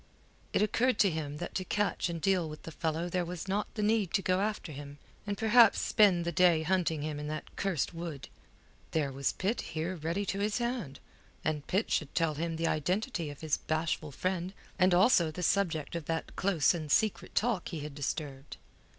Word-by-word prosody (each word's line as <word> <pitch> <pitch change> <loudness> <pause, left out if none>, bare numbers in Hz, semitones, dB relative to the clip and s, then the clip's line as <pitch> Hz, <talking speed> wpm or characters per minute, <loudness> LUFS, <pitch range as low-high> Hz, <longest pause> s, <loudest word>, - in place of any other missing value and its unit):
It - - +2
occurred 245 +4 +2
to 195 - +4
him 150 -2 -4
that 175 - -5
to 185 - -1
catch 205 -1 0
and 170 -1 -3
deal 180 -2 +1
with 155 - -9
the 165 - -7
fellow 160 +1 -2
there 180 0 0
was 175 +1 -6
not 200 +2 -1
the 210 - -1
need 210 -3 +2
to 195 - +1
go 185 0 +2
after 205 -5 -2
him, 145 0 -8 0.3
and 200 -1 -2
perhaps 225 +2 +6
spend 190 -6 +4
the 170 - 0
day 175 -3 +4
hunting 165 -3 +1
him 150 -1 -3
in 150 - -5
that 155 0 -6
cursed 185 -5 -1
wood. 165 -4 -6 0.7
There 150 -4 +1
was 135 0 -1
Pitt 210 +6 -1
here 165 +4 -3
ready 170 +5 -2
to 195 +1 -2
his 205 +2 0
hand, 235 - -3 0.5
and 150 -2 -1
Pitt 195 +4 0
should 150 -3 -1
tell 165 -3 +2
him 165 +2 -2
the 165 +1 -1
identity 175 - -1
of 145 - -10
his 155 -2 +1
bashful 155 -1 -2
friend, 185 +4 -2 0.2
and 185 -1 +5
also 180 -3 +5
the 180 +3 -5
subject 165 -4 +1
of 170 -3 -4
that 165 +1 -3
close 185 -7 +3
and 155 -4 -4
secret 215 +3 +1
talk 220 -5 +1
he 160 -4 -5
had 150 0 -6
disturbed. 140 -1 -4
170 Hz, 200 wpm, -31 LUFS, 155-195 Hz, 0.7 s, perhaps